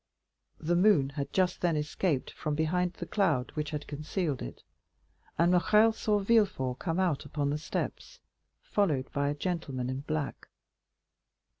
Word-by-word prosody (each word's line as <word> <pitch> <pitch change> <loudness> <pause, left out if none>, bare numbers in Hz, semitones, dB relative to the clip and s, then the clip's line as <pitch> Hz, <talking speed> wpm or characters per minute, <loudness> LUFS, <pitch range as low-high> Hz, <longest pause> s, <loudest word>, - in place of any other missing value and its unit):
The 170 +3 0
moon 180 -7 +4
had 140 0 -4
just 185 -1 +1
then 170 -3 +2
escaped 150 -1 -1
from 150 -1 -3
behind 175 +3 +1
the - - -6
cloud 165 -12 +1
which 150 -2 -3
had 150 -1 -4
concealed 150 0 -3
it, - - -7 0.7
and 170 +2 +4
Morrel 210 +5 +5
saw 210 -1 +1
Villefort 195 - +2
come 165 0 -1
out 175 -7 +1
upon 145 -1 -2
the 150 - -1
steps, - - -4 0.4
followed 155 -11 0
by 140 0 0
a 145 - -1
gentleman 140 -7 -2
in 130 - -3
black. 150 0 -4
155 Hz, 150 wpm, -30 LUFS, 145-185 Hz, 0.7 s, Morrel